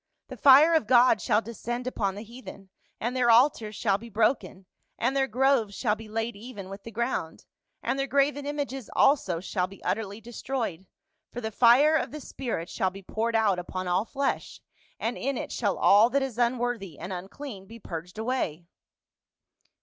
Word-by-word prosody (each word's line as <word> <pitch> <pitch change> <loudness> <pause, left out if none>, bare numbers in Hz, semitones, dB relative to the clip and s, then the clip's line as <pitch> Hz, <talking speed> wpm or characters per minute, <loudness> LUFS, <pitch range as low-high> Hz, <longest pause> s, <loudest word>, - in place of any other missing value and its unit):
The - - -7
fire 285 +4 +7
of 315 -10 +2
God 250 0 +5
shall 220 -2 +2
descend 240 +2 -5
upon 200 -6 -2
the 205 - -7
heathen, 225 -4 -12 0.3
and 240 +3 -2
their 250 -2 +2
altars 230 -3 +4
shall 200 -3 +1
be 235 +2 -11
broken, 215 -3 0 0.3
and 250 +4 0
their 270 -1 +2
groves 250 -4 +2
shall 215 -4 0
be 220 0 -11
laid 225 +1 -3
even 205 -3 -9
with 195 +1 -8
the 230 - -9
ground, 230 -8 -3 0.4
and 260 +3 -1
their 275 - 0
graven 280 +1 +1
images 280 -4 -4
also 265 - +3
shall 180 0 -2
be 195 +1 -15
utterly 205 -1 -2
destroyed, 225 -5 -4 0.4
for 245 - -6
the 220 -2 -4
fire 250 +8 +5
of - - 0
the 305 - -7
spirit 240 - -5
shall 190 - -1
be 195 +1 -12
poured 225 +4 -2
out 210 -5 +2
upon 185 +1 -5
all 180 +4 +1
flesh, 275 +3 -3 0.4
and 230 +3 -2
in 275 0 -1
it - - -5
shall 205 -5 -1
all 210 +4 +6
that 275 +2 +1
is 250 -3 -5
unworthy 240 - -1
and 180 +3 -6
unclean 195 +3 -8
be 230 +2 -11
purged 175 -3 -8
away." 220 -9 -2
230 Hz, 180 wpm, -27 LUFS, 200-260 Hz, 0.4 s, fire